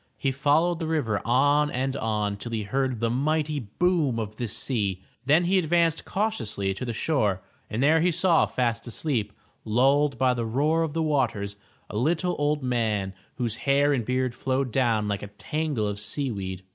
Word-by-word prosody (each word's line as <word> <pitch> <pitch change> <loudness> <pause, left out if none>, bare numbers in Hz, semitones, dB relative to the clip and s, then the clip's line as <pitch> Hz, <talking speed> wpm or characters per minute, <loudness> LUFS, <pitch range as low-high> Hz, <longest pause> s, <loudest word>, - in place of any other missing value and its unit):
He 135 - 0
followed 150 +5 +2
the 165 - -3
river 125 -11 0
on 145 +5 +3
and 130 0 -2
on 105 -4 -1
till 115 +3 -7
he 110 -2 -1
heard 130 +2 -1
the 115 - +1
mighty 150 +3 0
boom 145 - 0
of 110 -1 -4
the 120 - -2
sea. 100 -5 -2 0.2
Then 155 +5 +5
he 190 +2 +3
advanced 165 -1 +1
cautiously 110 - -1
to 95 - -6
the 120 - -2
shore 110 - 0 0.3
and 115 +5 -1
there 160 +3 +4
he 180 +1 +3
saw 170 0 +3
fast 120 -2 -1
asleep, 120 -4 -1 0.3
lulled 135 +6 +2
by 130 -1 +3
the 120 -1 -2
roar 145 +8 +1
of 160 -3 -1
the 165 0 0
waters, 120 -10 0 0.3
a 105 - -5
little 170 - +1
old 145 -1 0
man 110 -6 0 0.2
whose 115 -3 -2
hair 145 +1 +4
and 125 -4 0
beard 130 +1 -1
flowed 130 +1 -1
down 115 -4 +1
like 100 -1 -2
a 105 - -6
tangle 145 +3 -2
of 105 0 -3
sea 135 +5 -2
weed. 95 -3 -5
130 Hz, 185 wpm, -26 LUFS, 110-150 Hz, 0.3 s, Then